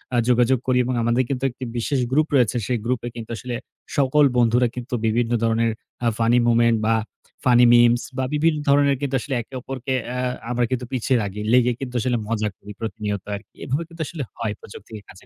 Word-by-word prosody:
আ - - +3
যোগাযোগ 125 +1 +3
করি 130 -1 +3
এবং 130 - -1
আমাদের 120 +2 +2
কিন্তু 135 -2 -2
একটি 125 - -10
বিশেষ 135 +4 0
গ্রুপ 150 +3 +3
রয়েছে 125 -2 +3
সেই 125 - 0
গ্রুপে 120 0 -1
কিন্তু 115 -2 -7
আসলে 125 +1 -5 0.4
সকল 140 +2 +4
বন্ধুরা 120 +1 +4
কিন্তু 125 0 -7
বিভিন্ন 115 +1 +1
ধরনের 115 0 +2 0.3
আ - - +3
ফানি 115 +1 +3
মোমেন্ট 115 -1 +4
বা 115 - +3 0.5
ফানি 125 -1 +6
মিমস 120 0 +5 0.2
বা 130 - 0
বিভিন্ন 155 +1 +2
ধরনের 140 0 +4
কিন্তু 140 -1 -1
আসলে 135 +1 -3
একে 115 - -16
অপরকে 130 +1 -4
অ্যা 125 +1 -3 0.3
আমরা 125 0 +1
কিন্তু 125 -1 -1
পিছিয়ে 130 0 +1
রাগি 100 0 -4
লেগে 125 0 +5
কিন্তু 125 -2 -6
আসলে 125 +1 0
মজা 110 -1 -1
করি 105 - -11
প্রতিনিয়ত 105 -2 -3
আরকি। 100 - -12
এভাবে 140 +6 -1
কিন্তু 165 -1 -9
আসলে 160 -5 -5
হয় 110 -3 -2
প্রযুক্তিকে 105 +1 -11
কাজে 95 - -15
120 Hz, 195 wpm, -22 LUFS, 115-130 Hz, 0.5 s, ফানি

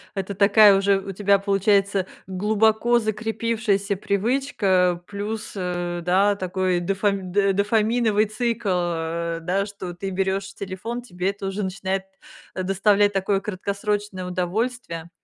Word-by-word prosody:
это 195 +1 -3
такая 200 0 +6
уже 195 0 +3
у 195 0 -6
тебя 200 0 +2
получается 195 -1 +2 0.2
глубоко 220 +4 +2
закрепившаяся 215 -2 -1
привычка, 195 -5 +1
плюс, 210 +2 -5
э, 175 -1 -3
да, 200 +3 +3
такой 185 -1 0
дофами 195 +1 0
дофаминовый 215 +2 +2
цикл, 230 0 -2
э, 170 -2 -1
да, 190 +4 0
что 190 -3 -7
ты 195 +2 -5
берёшь 195 +1 -2
телефон, 200 +6 -5
тебе 185 -4 -2
это 200 -1 -6
уже 195 +2 -3
начинает, 190 0 -2 0.5
э, 185 - -2
доставлять 200 +2 +3
такое 195 0 0
краткосрочное 200 0 -3
удовольствие, 180 -1 -3
195 Hz, 120 wpm, -23 LUFS, 185-210 Hz, 0.5 s, такая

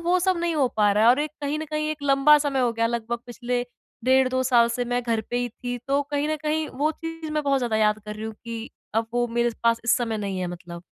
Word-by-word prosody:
वो 365 +1 +4
सब 375 0 +2
नहीं 340 -1 0
हो 275 -3 +3
पा 210 -1 +4
रहा 210 +2 +2
है - - +7
और 260 +4 +3
एक 300 -1 -2
कहीं 290 +2 -1
न 315 - -3
कहीं 305 0 -1
एक 300 -2 -5
लंबा 280 +2 +6
समय 270 -2 0
हो 240 -2 +2
गया 230 0 +1
लगभग 235 0 -2
पिछले 245 0 -2 0.4
डेढ़ 260 0 +4
2 260 0 0
साल 240 -2 +4
से 245 +1 -1
मैं 245 0 -1
घर 230 -2 0
पे 245 - -1
ही 245 0 0
थी। 245 +2 -5
तो 280 +1 +3
कहीं 290 +1 0
न 310 - 0
कहीं 310 0 0
वो 305 +2 +2
चीज़ 325 -1 -7
मैं 305 0 0
बहुत 275 -1 +2
ज़्यादा 235 -3 0
याद 210 0 +3
कर 210 0 -6
रही 215 +1 -7
हूँ 220 -1 -5
कि 230 0 -6 0.2
अब 225 0 +1
वो 240 0 +2
मेरे 235 +1 +1
पास 230 0 +3
इस 235 - +4
समय 230 -3 -1
नहीं 195 -2 -3
है 180 - -1
मतलब। 175 0 -8
245 Hz, 280 wpm, -25 LUFS, 230-290 Hz, 0.4 s, है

